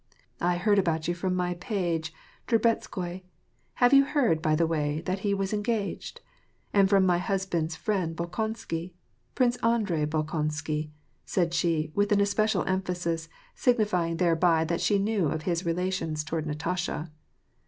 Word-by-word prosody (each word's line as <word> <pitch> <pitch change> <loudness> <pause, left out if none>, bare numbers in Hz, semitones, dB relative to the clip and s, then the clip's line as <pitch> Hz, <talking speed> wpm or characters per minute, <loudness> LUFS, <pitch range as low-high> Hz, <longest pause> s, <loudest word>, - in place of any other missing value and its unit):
^' - - -45 0.4
I 175 0 +2
heaxd 205 +3 +3
about 160 -4 0
you 175 - +1
from 185 +1 -2
my 180 -1 0
' 175 - -14
page,' 170 -6 -1 0.4
Drubetskoi. 195 -6 0 0.3
— - - -42
Have 245 +2 +6
you 275 0 +8
heard, 250 - +1
by 155 -1 +2
the 165 +2 +2
way, 150 -2 -1
that 185 +3 -2
he 200 +1 -1
was 195 +1 -2
engaged? 210 0 -2 0.3
— - - -40
and 195 -1 +5
from 195 -2 +5
my 175 -1 +3
husband's 175 -4 -1
friend 185 -6 -1
Bolkon 220 +7 -3
sky. 170 -1 -5 0.4
Prince 245 -1 +2
Andrei 210 -11 +1
Bolkonsky," 155 0 -2 0.3
said 175 -3 0
she, 160 -3 +1
with 205 0 +1
especial 205 +1 +2
em 190 0 +1
phasis, 170 -3 -3 0.3
signifying 205 -9 +1
thereby 165 -1 +3
that 170 +1 -1
she 205 - +3
knew 200 -3 +1
of 155 +2 -2
his 175 -1 -1
relations 170 -3 -1
toward 155 0 -3
Natasha. 165 +1 -3
175 Hz, 165 wpm, -27 LUFS, 165-200 Hz, 0.4 s, you